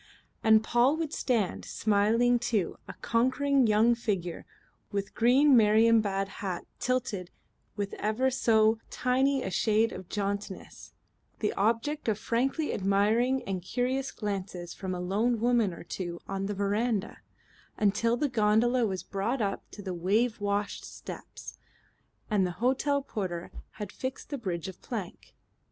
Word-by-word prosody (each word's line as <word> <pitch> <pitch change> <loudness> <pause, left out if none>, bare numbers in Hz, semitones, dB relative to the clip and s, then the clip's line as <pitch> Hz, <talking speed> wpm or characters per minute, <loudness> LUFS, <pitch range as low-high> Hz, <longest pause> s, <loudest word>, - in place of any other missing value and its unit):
And 220 0 +6
Paul 245 +7 +3
would 320 -2 -3
stand, 230 -7 0
smiling 225 +4 +2
too, 225 -6 -1
a - - -7
conquering 260 +2 +2
young 220 +3 +4
figure 195 -7 -3 0.4
with 200 -1 -3
green 260 +4 +5
Marienbad 215 -3 +4
hat 185 -3 -3
tilted 240 -8 -1 0.5
with 200 -2 -3
ever 220 +6 +1
so 220 -3 +3
tiny 265 +2 +1
a 190 - -3
shade 220 +4 +2
of 185 -1 -9
jauntiness, 200 -1 -4 0.4
the 210 - -1
object 235 +9 0
of 215 -3 +1
frankly 270 +8 0
admiring 215 +7 +2
and 190 -2 -3
curious 255 +7 -1
glances 190 -4 -4
from 185 -1 -4
a - - -4
lone 215 +6 0
woman 235 -3 +2
or 170 - -9
two 170 0 -5
on 195 0 -3
the 205 - -3
veranda, 205 +2 -1 0.6
until 215 +3 +2
the 295 - +1
gondola 235 +1 +3
was 190 -3 -3
brought 205 +8 -2
up 200 -3 -2
to 205 - -10
the 190 -1 -4
wave 210 +6 +1
washed 205 0 -1
steps, - - -9 0.7
and 210 -3 +2
the 180 - -5
hotel 270 +5 +1
porter 180 -9 -4 0.2
had 210 -2 -6
fixed 260 +3 -6
the 285 - -3
bridge 180 -7 -3
of 190 - -9
plank. 210 -8 -7
215 Hz, 140 wpm, -29 LUFS, 195-245 Hz, 0.7 s, And